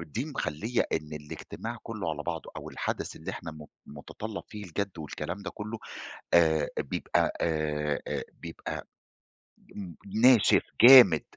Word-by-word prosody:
دي 85 - -4
مخلّية 120 - -1
إن 75 0 -2
الإجتماع 75 -1 -7
كلّه 80 - -4
على 75 -1 -4
بعضه 80 0 -5
أو - - -7
الحدث - - -4
اللي - - -6
إحنا 80 - -7
م 75 -1 -11 0.2
متطلَّب 100 +9 -7
فيه 105 -1 -8
الجَدّ 100 +4 -3
والكلام 85 +5 -5
ده 95 - -5
كلّه 105 +2 -6 0.6
آآ، 80 -2 +4
بيبقى - - 0
آآ، 75 -2 0
آآ، - - -2 0.2
بيبقى 85 -1 -6 0.9
ن 95 -4 -7 0.3
ناشف، 125 -3 +6 0.2
جامد. 120 - +10
85 Hz, 135 wpm, -28 LUFS, 75-105 Hz, 0.9 s, جامد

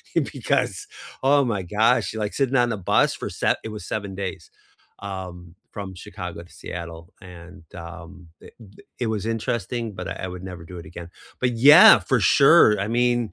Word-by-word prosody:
because, 410 - -1 0.4
oh 140 +1 +4
my 105 -5 -2
gosh, 110 +7 +1
you - - -7
like 105 -1 -3
sitting 135 -1 0
on 120 -2 +2
a 110 - -3
bus 95 - +1
for - - -6
sev - - 0
it - - -6
was 105 -4 -8
7 100 -2 -5
days, 95 -1 -6 0.5
um, 90 -3 -8 0.2
from 100 -2 -8
Chicago 90 -3 -8
to 85 - -20
Seattle. 85 -1 -9
And, 90 0 -13
um, 85 +1 -11
d - - -13
d 100 -4 -17 0.2
it 120 - -1
was 110 -2 -3
interesting, 115 0 -3
but 90 - -6
I - - -5
I - - -5
would 90 0 -8
never 90 -3 -8
do 90 +2 -10
it 85 - -10
again. 85 +1 -10 0.3
But 125 -1 +1 0.2
yeah, 155 -4 +10
for 120 +7 0
sure 135 - +5
I 100 - -2
mean, 120 0 +2
100 Hz, 190 wpm, -23 LUFS, 90-115 Hz, 0.5 s, yeah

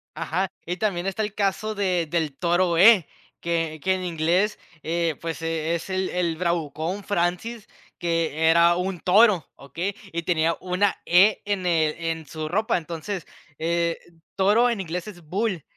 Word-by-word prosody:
Ajá. 165 +4 -2
Y 175 +2 -3
también 190 -3 -1
está 195 +3 -2
el 210 - -4
caso 210 +2 -1
de 185 -5 0
del 155 -4 -1
toro 175 0 +2
E, 195 -2 +7 0.3
que 165 -2 -2
que 190 - +3
en 185 -1 -3
inglés, 175 +4 +1 0.3
eh, 165 0 0
pues, 165 -1 -4
eh, 165 0 -1
es 170 - -6
el 190 0 -1
el 170 -3 -1
bravucón 170 +2 -2
Francis, 200 +4 -2 0.3
que 165 -2 +1
era 170 +1 +5
un 180 0 -2
toro, 195 - +4
¿okey? 170 +9 -5 0.2
Y 170 0 -2
tenía 165 -1 +1
una 185 +2 +1
E 190 +5 +5
en 200 -3 -2
el 160 -3 +2
en 165 -1 -3
su 155 +1 -5
ropa. 210 +6 +1
Entonces, 170 +2 -5 0.3
eh, 170 +1 0 0.4
toro 210 +5 +4
en 225 -5 -1
inglés 175 +1 -5
es 185 -5 -10
bull 190 0 -2
175 Hz, 165 wpm, -24 LUFS, 165-195 Hz, 0.4 s, E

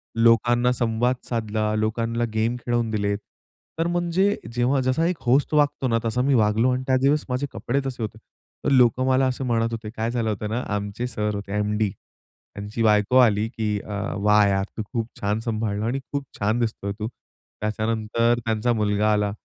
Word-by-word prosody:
लोकांना 120 +2 +4
संवाद 120 +1 +1
साधला, 110 -2 -1
लोकांना 115 +2 -1
गेम 115 +2 +1
खेळवून 120 -1 0
दिलेत. 100 -1 0 0.6
तर 165 - +1
म्हणजे 175 +3 +1 0.2
जेव्हा 125 +3 +2
जसा 130 +6 +2
एक 180 -3 -1
होस्ट 135 +5 +2
वागतो 145 -3 +2
ना, 115 -1 +2
तसा 115 +2 0
मी 135 +1 +2
वागलो 110 +3 +3
आणि 130 +1 -1
त्याच 130 -1 +3
दिवस 145 +2 +2
माझे 130 +3 -1
कपडे 120 +5 -1
तसे 125 -3 -4
होते. 110 0 -5 0.5
तर - - +3
लोकं 130 0 +4
मला 130 0 +3
असं 130 +1 -2
म्हणत 115 -1 +1
होते, 115 -1 -5
काय 115 +1 -3
झालं 115 -3 -1
होतं 105 0 -3
ना? 120 +3 -1
आमचे 105 +4 -3
सर 105 -3 -2
होते, 100 -1 -6
एम-डी, 105 0 0
त्यांची 105 +3 -9
बायको 105 +3 +4
आली, 110 -3 +4
"की 105 -3 -2
अ, 105 - -8 0.3
वाह 105 0 +5
यार! 95 0 +1
तू 110 - -2
खूप 115 -1 -1
छान 105 +2 0
सांभाळल 110 -3 -2
आहे 110 - -1
आणि 135 +3 -1
खूप 140 -1 -2
छान 110 +4 +1
दिसतो 110 -3 -2
आहे 100 - -1
तू." 105 - -2
त्याच्यानंतर 110 +1 -2
त्यांचा 115 +1 0
मुलगा 105 0 +1
आला, 105 -1 +1
115 Hz, 190 wpm, -24 LUFS, 105-125 Hz, 0.6 s, वाह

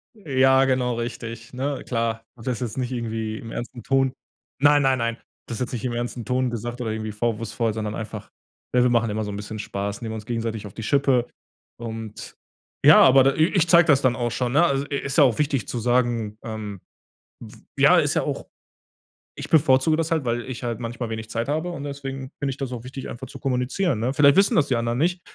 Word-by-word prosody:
Ja, 135 -7 +3
genau 125 -2 +1
richtig, 115 0 -6
ne? 135 +2 -3
Klar, 115 -2 -1
hab 115 - -13
das 125 -3 -1
jetzt 120 0 -4
nicht 130 0 -2
irgendwie 110 -2 -3
im 115 - -9
ernsten 120 -1 -6
Ton 135 -1 +2 0.5
nein, 145 0 +6
nein, 135 -1 +3
nein. 115 -1 -1
Habe - - -29 0.2
das 115 - -5
jetzt 125 - -2
nicht 125 0 -4
im 120 - -1
ernsten 120 0 -4
Ton 130 0 0
gesagt 120 +2 -5
oder 110 -2 -2
irgendwie 110 -1 -4
vorwurfsvoll, 115 0 -1
sondern 110 -1 -3
einfach, 110 -1 -7 0.4
äh, 125 - +4
wir 125 - +4
machen 115 -2 +2
immer 110 +1 -2
so 105 - -4
'n - - -5
bisschen 105 +1 -6
Spaß, 100 +1 -4
nehmen 110 -1 -4
uns 105 -1 -7
gegenseitig 115 -3 -3
auf 95 - -13
die 110 - -7
Schippe 135 -2 +2 0.5
und, 115 -2 -7 0.5
ja, - - +9
aber 135 +1 +6
i 155 - +5
i - - +1
ich 170 -2 +3
zeig 170 -1 +7
das 140 -3 +4
dann 130 -2 +2
auch 120 -1 -1
schon, 125 0 -1
ne? 155 - +5
E - - +5
e - - +2
also, 140 +1 0
äh, 140 - -2
ist 140 - -2
ja - - +9
auch 120 -5 +3
wichtig 140 -5 0
zu 120 - -4
sagen, 120 -3 0
ähm, 105 -4 -6 0.6
w - - -11 0.2
ja, - - +6
ist - - +2
ja - - +2
auch - - -4 0.9
ich - - -7
bevorzuge 155 0 +4
das 165 0 -1
halt, 160 -5 +1
weil 120 0 0
ich 130 -1 -7
halt 120 -1 -3
manchmal 120 0 -4
wenig 110 -1 -5
Zeit 115 +2 -2
habe 160 +4 -1
und 145 -4 -6
deswegen 135 -2 -6
finde 140 -2 -1
ich 130 - -7
das 135 -2 -4
auch 120 -1 -6
wichtig, 130 +1 -7
einfach 130 +2 -7
zu - - -11
kommunizieren, 130 - 0
ne? 125 +4 0
Vielleicht 140 0 +5
wissen 200 +3 +4
das 150 -3 +3
die 125 - +1
anderen 115 +1 -1
nicht 175 +2 +1
125 Hz, 235 wpm, -24 LUFS, 115-135 Hz, 0.9 s, ja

